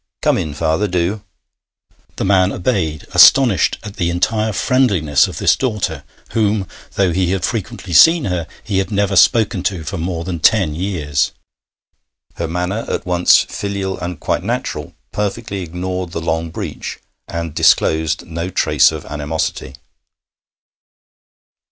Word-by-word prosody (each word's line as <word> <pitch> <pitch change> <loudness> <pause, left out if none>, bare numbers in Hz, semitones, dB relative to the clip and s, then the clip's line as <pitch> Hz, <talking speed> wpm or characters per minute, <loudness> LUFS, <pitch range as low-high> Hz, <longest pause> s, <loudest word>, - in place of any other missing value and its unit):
'Come - - +3
in, 75 -2 -4
father, 80 +6 0
do.' 90 +3 -1 0.9
The - - -2
man 95 -1 +3
obeyed, 90 - -2
astonished 90 +2 +6
at 105 -1 -9
the 85 -3 0
entire 110 +5 0
friendliness 100 - +2
of - - -8
this - - +3
daughter, 100 - -2 0.3
whom, 105 -3 0 0.3
though 95 -3 +2
he 90 0 +1
had 95 -2 -1
frequently 110 -4 -4
seen 165 - +6
her, 90 -3 -2 0.2
he 100 -3 -1
had 95 - -2
never 100 -2 0
spoken 105 0 +4
to 90 -2 -2
for 95 +4 -5
more 85 0 -3
than 85 -1 -4
ten 95 -2 +3
years. 75 -5 -1 1.0
Her 85 - -2
manner, 90 +6 -2
at - - -3
once 90 -1 +4
filial 100 -1 -4
and 90 -3 -5
quite - - -1
natural, - - -4 0.2
perfectly 105 -1 -3
ignored 90 +1 -4
the - - -2
long 80 0 -2
breach, - - -6 0.3
and 85 -2 -5
disclosed 80 0 +2
no 85 +1 -4
trace - - +3
of - - -7
animosity. 75 -2 -4
90 Hz, 140 wpm, -18 LUFS, 80-100 Hz, 1.0 s, astonished